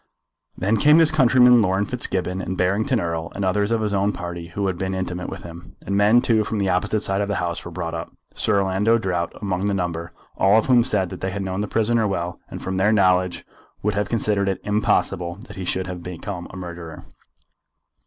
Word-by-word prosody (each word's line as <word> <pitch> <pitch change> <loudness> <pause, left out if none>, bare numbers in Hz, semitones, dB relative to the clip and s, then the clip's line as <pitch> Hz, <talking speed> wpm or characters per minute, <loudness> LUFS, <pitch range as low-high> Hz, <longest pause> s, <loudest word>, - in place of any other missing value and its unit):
Then 100 +4 +1
came 150 +8 +6
his 165 -2 +6
countryman 125 -4 +6
Laurence 95 0 0
Fitzgibbon, 95 -6 -1
and 90 +1 -4
Barrington 105 +8 +1
Erle, 85 -3 -3
and 100 - -2
others 100 +2 +1
of 115 -1 +1
his 105 -2 -1
own 100 +1 +2
party 85 -2 -6
who 100 +3 -3
had 95 -1 0
been 95 +1 -3
intimate 90 -1 -4
with 95 -2 -8
him. 85 0 -11
And 100 - -1
men, 105 +4 +5
too, 110 -3 +2
from 110 - -3
the 100 -2 0
opposite 90 +4 0
side 95 -1 0
of 100 - -1
the 100 - -1
House 85 -1 -2
were - - -7
brought 85 -1 -5
up, 85 +1 -5 0.2
Sir 105 -2 +1
Orlando 100 +5 +2
Drought 90 -6 -2
among 100 -1 -2
the 100 - 0
number, 85 -2 -3 0.2
all 95 +3 +4
of 110 - +2
whom 125 -2 +5
said 95 -6 +1
that - - -8
they 95 - -1
had 100 +1 -4
known 95 +1 -2
the 105 - -2
prisoner 115 +1 +1
well, 90 -3 -3
and - - -8
from 95 0 -3
their 100 +3 +3
knowledge 90 -3 +2 0.4
would 105 0 +1
have 105 0 -1
considered 105 -3 0
it 95 - -2
impossible 95 -4 0
that - - -11
he 95 - -5
should 95 +1 -1
have 90 -1 -6
become 90 +1 -6
a 95 - -10
murderer. 85 -2 -8
95 Hz, 225 wpm, -22 LUFS, 90-105 Hz, 0.4 s, came